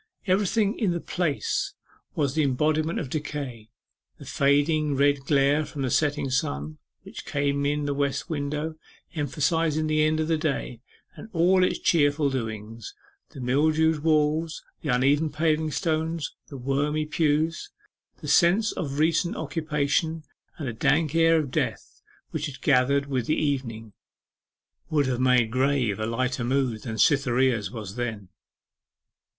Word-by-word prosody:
Everything 205 Hz, +2 st, +1 dB
in 195 Hz, -6 st, +1 dB
the 170 Hz, -, -2 dB
place 170 Hz, -4 st, -2 dB, 0.4 s
was 140 Hz, -3 st, 0 dB
the 155 Hz, -, +1 dB
embodiment 155 Hz, +4 st, +1 dB
of 150 Hz, -, -3 dB
decay: 135 Hz, -6 st, -5 dB, 0.5 s
the -, -, -12 dB
fading 145 Hz, +1 st, +2 dB
red 140 Hz, +1 st, +3 dB
glare 140 Hz, +1 st, +3 dB
from 145 Hz, -2 st, -5 dB
the 130 Hz, -, -1 dB
setting 145 Hz, -2 st, +1 dB
sun, 75 Hz, -, -2 dB, 0.2 s
which -, -, -9 dB
came 140 Hz, 0 st, 0 dB
in 150 Hz, +1 st, 0 dB
at -, -, -3 dB
the 145 Hz, -, -1 dB
west 140 Hz, -1 st, -1 dB
window, 150 Hz, 0 st, -3 dB, 0.4 s
emphasizing 155 Hz, +1 st, 0 dB
the 155 Hz, 0 st, +1 dB
end 155 Hz, 0 st, +2 dB
of 155 Hz, -, 0 dB
the 160 Hz, -1 st, +1 dB
day 140 Hz, -6 st, -3 dB, 0.3 s
and -, -, -11 dB
all 180 Hz, +2 st, +4 dB
its -, -, +1 dB
cheerful 145 Hz, -3 st, +2 dB
doings, 110 Hz, -3 st, -5 dB, 0.3 s
the -, -, -11 dB
mildewed 155 Hz, +5 st, +2 dB
walls, 155 Hz, +1 st, +1 dB, 0.2 s
the 150 Hz, -, -4 dB
uneven 140 Hz, +5 st, +2 dB
paving 155 Hz, 0 st, +1 dB
stones, 160 Hz, 0 st, -2 dB
the 140 Hz, -, -9 dB
wormy 145 Hz, +4 st, -1 dB
pews, 155 Hz, +1 st, 0 dB, 0.5 s
the -, -, -7 dB
sense 195 Hz, +6 st, +4 dB
of 140 Hz, -5 st, -4 dB
recent 165 Hz, +3 st, +1 dB
occupation, 155 Hz, +1 st, -1 dB, 0.3 s
and 145 Hz, -, -5 dB
the 120 Hz, -, -3 dB
dank 145 Hz, +6 st, +1 dB
air 165 Hz, 0 st, +4 dB
of 150 Hz, -5 st, -2 dB
death -, -, -3 dB, 0.3 s
which 150 Hz, -1 st, -2 dB
had 135 Hz, -3 st, -9 dB
gathered 140 Hz, +1 st, +3 dB
with 130 Hz, -4 st, -2 dB
the 155 Hz, -, +1 dB
evening, 115 Hz, -7 st, -2 dB, 1.0 s
would 150 Hz, -2 st, +2 dB
have 130 Hz, -1 st, -1 dB
made 125 Hz, -3 st, +3 dB
grave 130 Hz, -5 st, +1 dB
a 110 Hz, -, -1 dB
lighter 125 Hz, +2 st, -1 dB
mood 125 Hz, -3 st, 0 dB
than 115 Hz, -3 st, -5 dB
Cytherea's 130 Hz, -4 st, +2 dB
was 110 Hz, -4 st, -8 dB
then. 110 Hz, -6 st, -4 dB
145 Hz, 150 wpm, -26 LUFS, 130-155 Hz, 1.0 s, all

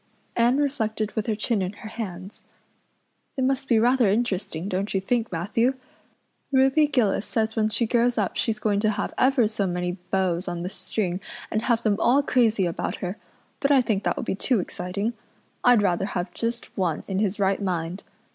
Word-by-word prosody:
Anne 240 Hz, +3 st, +3 dB
reflected 220 Hz, -7 st, -1 dB
with 220 Hz, -1 st, -3 dB
her 220 Hz, -, +1 dB
chin 215 Hz, 0 st, 0 dB
in 185 Hz, +1 st, -2 dB
her 215 Hz, -, -9 dB
hands. 195 Hz, -3 st, -7 dB, 0.9 s
"It 260 Hz, -, +1 dB
must 265 Hz, 0 st, 0 dB
be 235 Hz, -, +4 dB
rather 240 Hz, -1 st, +4 dB
interesting, 195 Hz, -5 st, -1 dB
don't 195 Hz, +1 st, -2 dB
you -, -, +3 dB
think, 230 Hz, +4 st, -1 dB
Matthew? 215 Hz, +10 st, +1 dB, 0.8 s
Ruby 270 Hz, +3 st, +4 dB
Gillis 240 Hz, -9 st, +1 dB
says 220 Hz, -1 st, -1 dB
when 215 Hz, -1 st, +2 dB
she 230 Hz, +2 st, +1 dB
grows 240 Hz, +1 st, +2 dB
up 205 Hz, -4 st, 0 dB
she's 225 Hz, -3 st, 0 dB
going 210 Hz, -1 st, +1 dB
to 215 Hz, +1 st, +2 dB
have 205 Hz, -1 st, -2 dB
ever 260 Hz, -2 st, +4 dB
so 210 Hz, -2 st, -1 dB
many 180 Hz, 0 st, -2 dB
beaus 185 Hz, -2 st, 0 dB
on 175 Hz, -1 st, -3 dB
the 180 Hz, -, -4 dB
string 185 Hz, -4 st, -2 dB, 0.3 s
and 215 Hz, -, 0 dB
have 235 Hz, -1 st, +1 dB
them 210 Hz, -2 st, +2 dB
all 270 Hz, +5 st, +4 dB
crazy 225 Hz, -7 st, +2 dB
about 170 Hz, -, -2 dB
her; 185 Hz, +3 st, -5 dB, 0.4 s
but 275 Hz, -, +1 dB
I 275 Hz, -3 st, +5 dB
think 210 Hz, -4 st, 0 dB
that -, -, 0 dB
would -, -, -3 dB
be -, -, -1 dB
too 225 Hz, +4 st, +1 dB
exciting. 190 Hz, +5 st, -3 dB, 0.5 s
I'd 245 Hz, -4 st, +5 dB
rather 185 Hz, -1 st, +1 dB
have 180 Hz, -2 st, -3 dB
just 235 Hz, +1 st, -3 dB
one 175 Hz, -5 st, -1 dB
in 190 Hz, -1 st, -1 dB
his 205 Hz, 0 st, 0 dB
right 195 Hz, 0 st, +1 dB
mind. 175 Hz, -1 st, -2 dB
215 Hz, 195 wpm, -25 LUFS, 190-240 Hz, 0.9 s, I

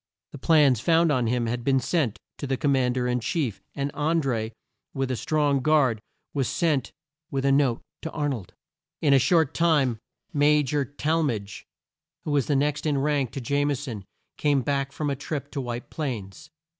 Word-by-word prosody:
The 145 Hz, -, -9 dB
plans 145 Hz, -6 st, +4 dB
found 165 Hz, +4 st, +3 dB
on 125 Hz, -4 st, +1 dB
him 120 Hz, 0 st, 0 dB
had 120 Hz, +1 st, -2 dB
been 135 Hz, +1 st, +3 dB
sent 130 Hz, -, 0 dB, 0.2 s
to 140 Hz, -, -4 dB
the 135 Hz, 0 st, 0 dB
Com 145 Hz, -, +1 dB
mand 130 Hz, -2 st, +2 dB
er 125 Hz, -1 st, 0 dB
in 125 Hz, 0 st, +1 dB
chief, 120 Hz, -, -2 dB
and 140 Hz, 0 st, -2 dB
An 160 Hz, +3 st, +1 dB
dré, 115 Hz, -6 st, -1 dB, 0.4 s
with 135 Hz, -1 st, -1 dB
a -, -, 0 dB
strong 145 Hz, +2 st, +1 dB
guard 130 Hz, -6 st, +3 dB, 0.3 s
was 135 Hz, -4 st, 0 dB
sent 150 Hz, -7 st, 0 dB, 0.4 s
with 135 Hz, -2 st, -2 dB
the 140 Hz, -, +3 dB
note 135 Hz, -4 st, +2 dB, 0.2 s
to 160 Hz, -, -4 dB
Ar 150 Hz, -2 st, -2 dB
nold. 120 Hz, -11 st, -4 dB, 0.5 s
In 145 Hz, -2 st, +5 dB
a 135 Hz, -, +6 dB
short 160 Hz, +2 st, +3 dB
time, 145 Hz, -9 st, +2 dB, 0.3 s
Ma 150 Hz, +1 st, +4 dB
jor 140 Hz, +1 st, 0 dB
Tall 155 Hz, +4 st, 0 dB
madge, 105 Hz, -9 st, -3 dB, 0.6 s
who 150 Hz, -, -3 dB
was 145 Hz, -1 st, +1 dB
next 145 Hz, +2 st, +1 dB
in 145 Hz, -2 st, +1 dB
rank 140 Hz, -2 st, +1 dB
to 135 Hz, -, -4 dB
Jame 140 Hz, +3 st, +1 dB
son, 120 Hz, -7 st, -6 dB, 0.3 s
came 145 Hz, -3 st, +2 dB
back 140 Hz, -1 st, -1 dB
from 145 Hz, -1 st, -2 dB
a -, -, -1 dB
trip 145 Hz, +1 st, -5 dB
to 140 Hz, -, -3 dB
White 120 Hz, -1 st, -5 dB
Plains. 125 Hz, -, -5 dB
140 Hz, 195 wpm, -26 LUFS, 125-150 Hz, 0.6 s, a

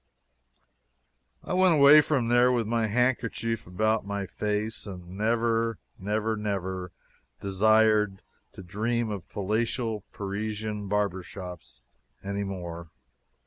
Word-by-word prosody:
I -, -, -4 dB
went 185 Hz, -2 st, +5 dB
away 145 Hz, +1 st, +8 dB
from 135 Hz, -6 st, 0 dB
there 120 Hz, +1 st, +5 dB
with 120 Hz, -2 st, +1 dB
my 115 Hz, 0 st, 0 dB
handkerchief 115 Hz, -1 st, 0 dB
about 110 Hz, +5 st, +1 dB
my 100 Hz, 0 st, -3 dB
face, 105 Hz, +3 st, -3 dB
and 90 Hz, -3 st, -8 dB
never, 115 Hz, +2 st, 0 dB, 0.2 s
never, 105 Hz, +3 st, -1 dB
never 95 Hz, -3 st, -3 dB, 0.5 s
desired 105 Hz, 0 st, +3 dB, 0.3 s
to 95 Hz, -, -10 dB
dream 110 Hz, +5 st, -1 dB
of 100 Hz, -5 st, -6 dB
palatial 110 Hz, +1 st, -1 dB
Parisian 105 Hz, +1 st, -4 dB
barber 100 Hz, -2 st, 0 dB
shops 90 Hz, -8 st, -10 dB, 0.4 s
anymore. 95 Hz, -4 st, -5 dB
105 Hz, 105 wpm, -27 LUFS, 95-115 Hz, 0.5 s, away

